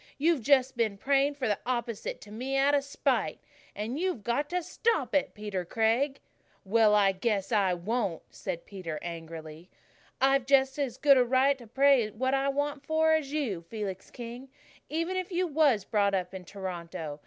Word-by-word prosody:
"You've 315 -1 +2
just 265 +1 +3
been 220 -4 0
praying 280 +5 +2
for 265 -4 -2
the 205 -2 0
opposite 235 -3 -3
to 210 - -12
me 255 +5 -2
out 275 +1 +3
of 285 -1 +3
spite. 260 - -1 0.4
And 225 +8 -3
you've 360 - -1
got 280 +6 -1
to 360 0 -1
stop 450 - 0
it, 290 - +1
Peter 205 -4 -4
Craig." 230 - +1 0.5
"Well, 215 +1 +4
I 200 -2 +5
just 190 0 -15
guess 210 -2 0
I 195 -5 +3
won't," 195 -1 -2
said 175 -3 -5
Peter 180 -6 -6
angrily. 165 0 -8 0.5
"I've 270 -1 +3
just 270 0 +3
as 270 -5 -2
good 280 -2 +6
a 250 - +5
right 260 +3 +3
to 240 - -12
pray 265 -1 +4
for 215 - -18
what 260 +2 0
I 275 0 +2
want 285 0 -2
as 315 -2 +2
you, 260 - -2
Felix 200 -4 -5
King, 240 +2 -8 0.4
even 330 +4 -1
if 370 +1 -3
you 360 +1 +1
was 285 - +2
brought 200 -2 +2
up 180 0 -2
in 185 -1 -8
Toronto. 170 -5 -6
240 Hz, 185 wpm, -29 LUFS, 200-280 Hz, 0.5 s, good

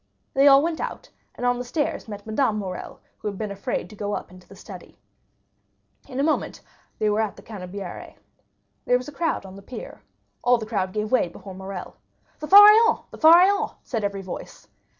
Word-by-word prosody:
They 275 +1 +5
all 275 0 +7
went 330 -1 -2
out, - - -6 0.3
and 245 - -4
on 245 0 +1
the - - -3
stairs 290 +2 -3
met 205 -2 -8
Madame 220 0 0
Morrel, 185 -3 -6 0.2
who - - -5
had 200 -2 -4
been 215 -1 -4
afraid 200 +5 -3
to - - -11
go 205 0 -4
up - - -7
into 185 0 -16
the - - -14
study. - - -12 1.1
In 265 -1 -6
a - - +2
moment 310 +1 -1 0.4
they 215 - 0
were 210 +1 +2
at 215 -2 -2
the - - -15
Canebière. 195 -2 -8 0.7
There 250 - +3
was 250 - -8
a - - -7
crowd 320 -7 -2
on 190 0 -11
the 195 - -11
pier. 245 +5 -9 0.4
All 245 0 +4
the 225 - -6
crowd 195 -4 -2
gave 210 +1 -3
way 255 -7 +3
before 190 +3 -11
Morrel. 190 -1 -8 0.4
"The 305 - -6
Pharaon! 420 +4 +8
the - - -11
Pharaon!" 360 +5 +5
said 225 -4 -3
every 200 -1 -3
voice. 185 - -9
220 Hz, 200 wpm, -24 LUFS, 200-280 Hz, 1.1 s, Pharaon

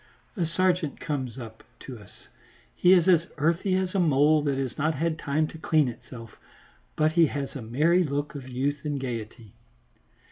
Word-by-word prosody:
A 175 -6 -1
sergeant 175 -2 0
comes 130 -6 -4
up 110 -3 -10 0.2
to 125 -4 -9
us; 100 - -19 0.5
he 180 - +4
is 180 -2 +4
as 170 -3 +4
earthy 170 +5 +1
as 185 -1 -1
a 195 - +1
mole 150 -2 +4
that 140 -2 -1
has 130 -3 -3
not 155 +1 0
had 165 +2 -1
time 150 +2 0
to 160 - -11
clean 155 -3 +2
itself, 115 -1 -10 0.6
but 155 0 +2
he 165 0 +4
has 140 0 -5
a 135 - -5
merry 155 +11 +2
look 145 -1 -3
of 135 -3 -8
youth 140 +3 -2
and 145 -2 -2
gaiety. 115 -4 -6
145 Hz, 180 wpm, -26 LUFS, 130-165 Hz, 0.6 s, he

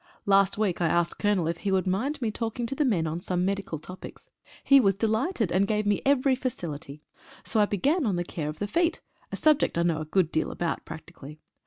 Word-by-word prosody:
Last 195 -1 +3
week 200 -5 0
I 170 - +3
asked 170 +1 0
the - - -10
Colonel 205 -6 +2
if 165 0 -2
he 200 - -2
would 190 -1 +1
mind 250 +10 -1
me 220 - 0
talking 230 +2 -3
to 240 - -3
the 295 - 0
men 190 -10 +1
on 160 +2 -3
some 180 0 -1
medical 195 -4 -2
topics. 180 +5 -11 0.3
He 275 0 +6
was 195 -6 +3
delighted, 220 - 0
and 190 +3 +2
gave 210 0 0
me 205 -1 +1
every 275 -1 +3
facility. 160 - -5 0.4
So 220 - 0
I 210 - +5
began 275 - +1
on 200 - 0
the 175 - -1
care 155 -3 -5
of 155 - -7
the 205 - -2
feet, 335 +10 0 0.3
a - - -3
subject 305 - +2
I 170 - +2
know 165 -2 0
a - - -4
good 165 +1 +1
deal 160 - 0
about 170 -2 -3
practically. 160 -2 -10
195 Hz, 230 wpm, -27 LUFS, 170-230 Hz, 0.4 s, He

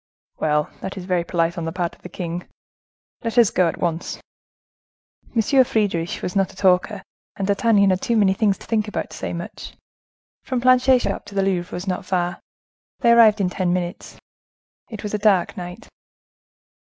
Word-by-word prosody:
"Well, 150 0 +1
that 190 - -6
is 185 - -6
very 180 -2 0
polite 170 0 -1
on 165 - -4
the 165 - -3
part 175 -1 -2
of - - -29
the 180 - -9
king. 175 0 -5 0.8
Let 230 +1 -3
us 235 -4 +6
go, 180 - +3
at 165 - -3
once." 170 -1 -3 1.2
Monsieur 260 +4 +4
Friedisch 200 -8 -1
was 180 - -3
not 195 -2 +1
a - - -18
talker, 190 +1 +2 0.3
and 195 - -2
D'Artagnan 200 -1 +3
had 185 - 0
too 235 - +1
many 195 -3 +4
things 200 -1 +1
to - - -14
think 220 -2 0
about 210 - -4
to - - -9
say - - -4
much. 170 0 -7 0.7
From 255 -2 -2
Planchet's 255 0 +4
shop - - -3
to 205 -1 -11
the 195 - +2
Louvre 185 -2 -1
was 180 - -5
not 185 -2 -2
far,—they 185 +6 -3
arrived 225 -2 +6
in 185 -2 0
ten 180 -1 0
minutes. 180 -1 -4 0.7
It 220 -2 -8
was 210 - -5
a 210 - 0
dark 200 -4 +2
night. 180 +3 -8
190 Hz, 185 wpm, -22 LUFS, 175-215 Hz, 1.2 s, us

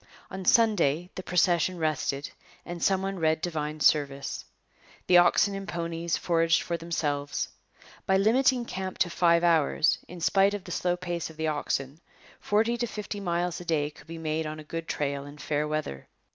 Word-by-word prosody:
On 190 0 -5
Sunday 180 -7 +3
the - - -6
procession 180 0 +2
rested 150 -3 -1 0.3
and 175 -1 -6
some 190 +1 +2
one 195 -1 -3
read 160 -1 +2
divine 155 -2 -3
service. 140 -1 +1 0.6
The 180 -1 +7
oxen 200 +3 +4
and 195 0 -6
ponies 170 -1 -2
foraged 165 -1 +2
for 170 - -2
themselves. 150 -4 -2 0.6
By 190 - +4
limiting 245 +4 +3
camp 190 -3 -5
to 175 - +1
five 170 0 +3
hours, 165 -1 +3
in 180 +1 -9
spite 195 +4 +3
of 200 - -6
the - - -9
slow 180 0 0
pace 175 -2 -4
of 160 - -14
the 160 0 0
oxen, 145 -1 -2 0.4
forty 225 +3 +1
to 240 0 -1
fifty 210 -1 -5
miles 175 -2 -1
a - - -10
day 150 -3 0
could 150 - -17
be 165 0 -7
made 160 0 -2
on 155 0 -6
a - - -9
good 165 +2 -6
trail 140 -1 -2
in 145 +1 -11
fair 150 0 -1
weather. 150 - -4
170 Hz, 180 wpm, -27 LUFS, 155-185 Hz, 0.6 s, The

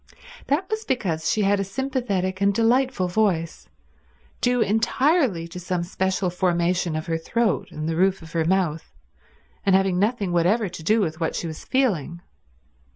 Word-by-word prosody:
That 310 +7 0
was 435 +2 -3
because 175 - -1
she 215 - +1
had 200 0 +2
a - - +1
sympathetic 200 -5 -2
and 200 0 +4
delightful 230 -1 +2
voice, 175 -4 -1 0.7
due 245 0 +2
entirely 225 - +2
to 180 - -7
some 180 0 -2
special 185 +1 -1
formation 175 -1 0
of 155 - -3
her 165 -1 -1
throat 230 +7 0
and 155 0 -5
the 165 - -1
roof 190 +1 +1
of 160 - -12
her 165 -1 0
mouth, 170 -2 0 0.7
and 195 -2 +4
having 190 -2 +2
nothing 205 -2 0
whatever 185 +5 +2
to 175 -1 -9
do 215 +7 +2
with 160 -4 -2
what 160 - -1
she - - -3
was 160 -2 -6
feeling. 175 - 0
190 Hz, 165 wpm, -23 LUFS, 170-225 Hz, 0.7 s, and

